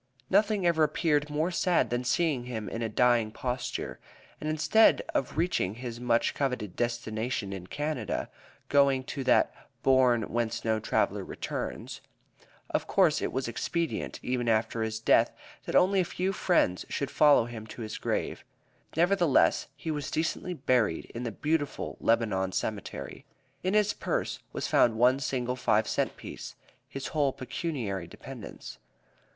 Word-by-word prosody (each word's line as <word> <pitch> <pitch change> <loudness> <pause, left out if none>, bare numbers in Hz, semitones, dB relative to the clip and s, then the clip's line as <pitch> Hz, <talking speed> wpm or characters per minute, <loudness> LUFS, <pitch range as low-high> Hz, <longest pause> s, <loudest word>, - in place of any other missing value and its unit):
Nothing 205 -1 +3
ever 165 -2 +4
appeared 150 -1 +1
more 155 +4 0
sad 180 -4 +2
than 120 +1 0
seeing 130 -1 +1
him 110 -4 -5
in 115 - -4
a 115 - -1
dying 120 0 +3
posture, 125 +1 -4 0.4
and 155 - -3
instead 160 +8 +4
of 135 - -1
reaching 160 - 0
his 120 -1 -6
much 120 -1 +2
coveted 125 -9 -2
destination 115 -3 -2
in 90 -2 -7
Canada, 145 -3 -2 0.4
going 140 -2 +4
to 135 +1 -5
that 130 - +3 0.3
"bourne 130 -3 +4
whence 115 0 -2
no 110 -1 +2
traveler - - 0
returns." - - -5 0.7
Of - - -1
course - - +3
it - - -1
was 130 0 -2
expedient, 165 +7 -2
even 125 -2 0
after 110 +1 +1
his 110 0 -2
death, - - +3 0.3
that - - -3
only 190 +1 +5
a - - +4
few 185 +2 -2
friends 170 - +2
should 140 - -2
follow 145 -6 +5
him 115 -2 -8
to 115 - -7
his 110 - -5
grave. - - -2 0.5
Nevertheless, 175 -4 +3
he 160 - -4
was 145 -3 -3
decently 165 +3 -2
buried 125 - +1
in 120 - -5
the 115 - -2
beautiful 145 +5 -2
Lebanon 100 -5 +1
Cemetery. 105 -1 -4 0.4
In 185 +3 0
his 210 -1 +3
purse - - -2
was - - -3
found 115 - +4
one 125 +4 +4
single 125 -2 -1
five 110 -4 +2
cent - - -1
piece, - - -8 0.3
his 135 0 -5
whole 145 -3 +1
pecuniary 125 - -4
dependence. - - -10
125 Hz, 150 wpm, -29 LUFS, 115-155 Hz, 0.7 s, only